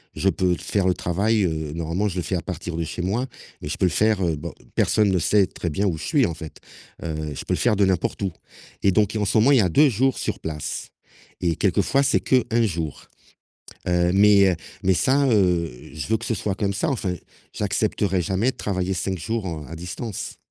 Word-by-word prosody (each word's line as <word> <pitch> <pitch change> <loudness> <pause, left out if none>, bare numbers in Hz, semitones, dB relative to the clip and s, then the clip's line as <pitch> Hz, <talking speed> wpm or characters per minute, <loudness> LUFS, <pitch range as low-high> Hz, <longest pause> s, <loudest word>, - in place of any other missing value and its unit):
je 95 - +2
peux 95 -2 +1
faire 95 +2 -1
le 90 - +4
travail, 100 +6 +1
heu 80 -4 -2
normalement, 85 +5 -1
je 90 - -6
le - - 0
fais 95 - -2
à - - -3
partir 85 -1 -5
de 85 - -1
chez 90 - -5
moi 105 +8 0 0.4
mais - - -6
je 75 - -2
peux - - +2
le - - +4
faire, 105 +4 +2
heu, 85 -2 +1
bon, 70 - -6 0.2
personne 105 -2 +3
ne 95 -1 +2
sait 100 +3 +3
très 85 - -4
bien 95 +7 -1
où 90 -5 0
je 75 - -7
suis, 145 -6 +3
en 85 - -2
fait, 80 -1 -9 0.5
heu, 80 - -3 0.2
je - - -5
peux - - -1
le - - -4
faire 120 -3 +3
de 100 - +3
n'importe 95 0 0
où 95 -2 0 0.5
et 100 - +5
donc 105 +2 +2
et - - 0
en 105 - +1
ce 100 - +1
moment, 115 +6 +5
il 140 - +6
y - - +5
a 95 - +3
2 145 - +5
jours 130 +3 +1
sur - - -3
place 75 -2 -5 0.5
et 85 -2 +1
quelquefois 140 +1 +2
c'est - - +2
qu' 130 -2 +3
1 115 0 +3
jour, 80 -7 -4 0.8
heu, 90 0 +2
mais 100 -1 +6
heu, 90 - -1 0.3
mais 95 - +4
ça, 140 +9 +3
heu, 90 - +2 0.2
je 80 - -4
veux 110 0 +2
que 115 - -7
ce 115 - 0
soit 100 -3 -2
comme 100 -1 -1
ça, 160 +10 0
enfin, 100 -9 -1 0.4
j'accepterai 100 -2 0
jamais 95 +8 +1
de - - -14
travailler 95 -2 -1
5 95 +1 -2
jours, 110 +4 -3
heu, 80 -3 -5
à 80 - -7
distance. 90 +6 -6
95 Hz, 240 wpm, -23 LUFS, 85-110 Hz, 0.8 s, il